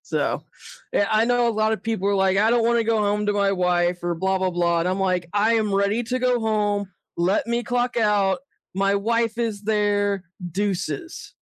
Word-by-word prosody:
So, -, -, -2 dB, 0.5 s
eh, 205 Hz, -, +3 dB
I 220 Hz, +1 st, +3 dB
know 245 Hz, 0 st, +2 dB
a -, -, +3 dB
lotta 220 Hz, 0 st, +1 dB
people 220 Hz, -4 st, -2 dB
are 200 Hz, -, +2 dB
like, 190 Hz, 0 st, +2 dB
"I 215 Hz, +3 st, +4 dB
don't 235 Hz, -1 st, +2 dB
wanna 235 Hz, 0 st, +2 dB
go 225 Hz, 0 st, +1 dB
home 210 Hz, 0 st, 0 dB
to 205 Hz, -, +2 dB
my 200 Hz, -1 st, +2 dB
wife 180 Hz, -1 st, +1 dB
or 175 Hz, -1 st, -1 dB
blah 190 Hz, +3 st, 0 dB
blah 185 Hz, 0 st, 0 dB
blah," 170 Hz, -1 st, +1 dB
and 170 Hz, -, 0 dB
I'm 185 Hz, +1 st, -1 dB
like, 180 Hz, -2 st, 0 dB
"I 215 Hz, +3 st, +3 dB
am 215 Hz, -3 st, 0 dB
ready 200 Hz, +4 st, +1 dB
to 255 Hz, +3 st, -2 dB
go 250 Hz, -1 st, +1 dB
home. 205 Hz, -3 st, 0 dB, 0.3 s
Let 175 Hz, +3 st, +1 dB
me 235 Hz, +1 st, -1 dB
clock 245 Hz, 0 st, -1 dB
out. 205 Hz, -3 st, +2 dB, 0.3 s
My 195 Hz, +1 st, +1 dB
wife 230 Hz, +2 st, 0 dB
is 220 Hz, -3 st, -2 dB
there. 205 Hz, -2 st, 0 dB, 0.3 s
Deuces." 205 Hz, -, -4 dB
205 Hz, 205 wpm, -23 LUFS, 190-225 Hz, 0.5 s, I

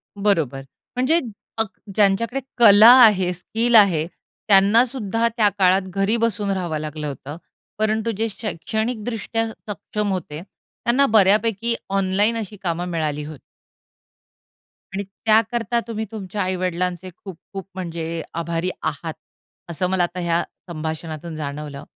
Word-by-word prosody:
बरोबर. 165 Hz, -10 st, 0 dB, 0.3 s
म्हणजे 260 Hz, +7 st, +3 dB, 0.4 s
अग 225 Hz, -, +2 dB, 0.3 s
ज्यांच्याकडे 215 Hz, +5 st, +2 dB, 0.2 s
कला 220 Hz, -1 st, +9 dB
आहे, 190 Hz, -5 st, +4 dB
स्किल 225 Hz, +6 st, 0 dB
आहे 185 Hz, -8 st, +6 dB, 0.4 s
त्यांना 205 Hz, +3 st, +6 dB
सुद्धा 230 Hz, -2 st, -1 dB
त्या 210 Hz, -3 st, +5 dB
काळात 190 Hz, 0 st, +4 dB
घरी 195 Hz, +4 st, +2 dB
बसून 215 Hz, -3 st, 0 dB
राहावं 175 Hz, -5 st, -2 dB
लागलं 150 Hz, 0 st, -5 dB
होतं. 145 Hz, +1 st, -7 dB, 0.4 s
परंतु 215 Hz, +1 st, 0 dB
जे 225 Hz, +1 st, 0 dB
शैक्षणिकदृष्ट्या 220 Hz, +3 st, -3 dB, 0.2 s
सक्षम 205 Hz, 0 st, -3 dB
होते 165 Hz, -5 st, -4 dB
त्यांना 235 Hz, +6 st, -1 dB
बऱ्यापैकी 215 Hz, +2 st, +3 dB
ऑनलाईन 195 Hz, +3 st, +1 dB
अशी 215 Hz, -2 st, -5 dB
कामं 175 Hz, 0 st, -2 dB
मिळाली 155 Hz, -3 st, -2 dB
होती. 150 Hz, -2 st, -9 dB, 1.5 s
आणि 200 Hz, +1 st, -2 dB
त्याकरता 225 Hz, +4 st, +1 dB
तुम्ही 220 Hz, -1 st, -3 dB
तुमच्या 205 Hz, -2 st, -5 dB
आई-वडिलांचे 180 Hz, -1 st, -2 dB
खूप 190 Hz, -5 st, -8 dB, 0.2 s
खूप 195 Hz, -1 st, -6 dB
म्हणजे 165 Hz, -2 st, -4 dB, 0.2 s
आभारी 170 Hz, +1 st, -2 dB, 0.2 s
आहात 160 Hz, +3 st, -7 dB, 0.6 s
असं 170 Hz, +2 st, -1 dB
मला 185 Hz, -1 st, +2 dB
आता 175 Hz, +1 st, -3 dB
ह्या 170 Hz, -1 st, +1 dB, 0.2 s
संभाषणातून 160 Hz, 0 st, -5 dB
जाणवलं. 145 Hz, -1 st, -6 dB
195 Hz, 125 wpm, -22 LUFS, 170-220 Hz, 1.5 s, कला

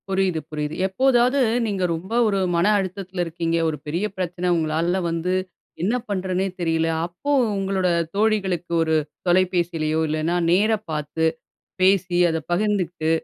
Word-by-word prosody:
புரியுது, 190 Hz, -3 st, +1 dB
புரியுது. 150 Hz, 0 st, -3 dB
எப்போதாவது, 255 Hz, +5 st, +3 dB, 0.2 s
நீங்க 200 Hz, -4 st, -1 dB
ரொம்ப 185 Hz, +7 st, -7 dB
ஒரு 200 Hz, -2 st, +1 dB, 0.2 s
மன 170 Hz, +1 st, +2 dB
அழுத்தத்தில 190 Hz, -1 st, -3 dB
இருக்கீங்க. 165 Hz, 0 st, -1 dB
ஒரு 155 Hz, -, -4 dB
பெரிய 170 Hz, +7 st, -1 dB
பிரச்சனை. 180 Hz, 0 st, -2 dB
உங்களால 165 Hz, +4 st, 0 dB
வந்து 165 Hz, +2 st, -1 dB, 0.5 s
என்ன 215 Hz, +6 st, +1 dB
பண்றதுன்னே 190 Hz, -1 st, -1 dB
தெரியல. 165 Hz, -1 st, +1 dB, 0.2 s
அப்போ 180 Hz, +12 st, -5 dB, 0.3 s
உங்களோட 195 Hz, -1 st, 0 dB, 0.3 s
தோழிகளுக்கு 195 Hz, -5 st, 0 dB
ஒரு 160 Hz, 0 st, +1 dB, 0.3 s
தொலைபேசிலயோ, 175 Hz, -3 st, +1 dB
இல்லைன்னா 155 Hz, +3 st, 0 dB, 0.2 s
நேர 205 Hz, +5 st, +3 dB, 0.2 s
பாத்து, 150 Hz, +1 st, -2 dB, 0.6 s
பேசி, 185 Hz, -1 st, +3 dB
அத 160 Hz, -, 0 dB
பகிர்ந்துகிட்டு, 180 Hz, -4 st, 0 dB
180 Hz, 125 wpm, -23 LUFS, 165-195 Hz, 0.6 s, எப்போதாவது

